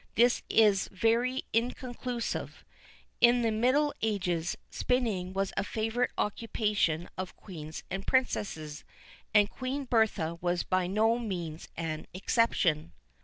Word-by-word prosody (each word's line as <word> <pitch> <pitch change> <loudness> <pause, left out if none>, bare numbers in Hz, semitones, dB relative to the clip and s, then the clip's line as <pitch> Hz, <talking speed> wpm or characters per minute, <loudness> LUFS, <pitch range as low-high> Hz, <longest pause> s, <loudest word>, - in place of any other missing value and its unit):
This 240 +2 +4
is 210 -3 +4
very 235 +6 +1
inconclusive. 245 0 -2 0.5
In 240 0 +5
the 225 - +2
middle 255 +7 +2
ages, 180 -6 0
spinning 220 -8 0
was 195 0 -1
a - - 0
favourite 225 +4 0
occupation 210 -6 0
of 185 -1 -4
queens 160 -5 -8
and 195 +1 -4
princesses, 160 - 0 0.5
and 205 -1 +5
Queen 265 +5 -4
Bertha 215 -9 +1
was 175 0 0
by 185 -1 +1
no 220 +5 +2
means 175 -8 -4
an 160 -1 -3
exception. 185 - +1
210 Hz, 120 wpm, -30 LUFS, 180-240 Hz, 0.5 s, In